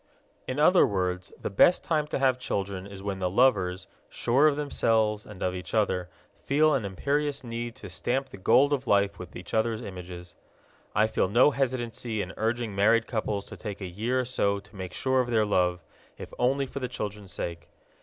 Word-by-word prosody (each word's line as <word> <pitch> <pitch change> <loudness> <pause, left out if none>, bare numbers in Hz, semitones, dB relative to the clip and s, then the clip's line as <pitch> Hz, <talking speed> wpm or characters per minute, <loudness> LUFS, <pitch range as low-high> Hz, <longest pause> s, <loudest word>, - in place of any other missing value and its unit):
In 130 - -3
other 175 +5 +6
words, 90 -2 -2
the - - -4
best 170 - +5
time 155 -5 0
to - - -2
have 130 -2 +2
children 100 -5 -3
is 100 -1 -10
when 100 -1 -3
the 90 -1 0
lovers, 95 -4 +2 0.2
sure 135 +6 +3
of 150 - +2
themselves 110 -7 +1
and 105 -3 -8
of 90 - 0
each 90 +2 -5
other, 95 -4 +1 0.3
feel 155 +2 +3
an 125 -7 0
imperious 140 +9 -1
need 120 0 -5
to 100 - -10
stamp 130 +8 -2
the - - -10
gold 140 +9 +4
of 135 -2 -2
life 100 -1 +2
with 90 -1 -9
each 90 - -9
other's 110 0 +1
images. 90 -3 -8 0.6
I 105 - +5
feel 110 -3 0
no 120 +8 +5
hesitancy 120 -4 -2
in 90 - -8
urging 115 0 -1
married 110 +3 +3
couples 105 -3 -2
to - - -10
take 105 -3 -6
a 95 - -5
year 110 +8 -1
or - - -4
so 100 -5 0
to - - -20
make 95 -2 -6
sure 130 0 +1
of 120 - -3
their 110 -3 +3
love, 90 -4 +1 0.3
if - - -9
only 135 +3 +2
for 135 - -6
the 130 - -2
children's 105 -5 -6
sake. 85 -1 -5
110 Hz, 200 wpm, -27 LUFS, 95-130 Hz, 0.6 s, other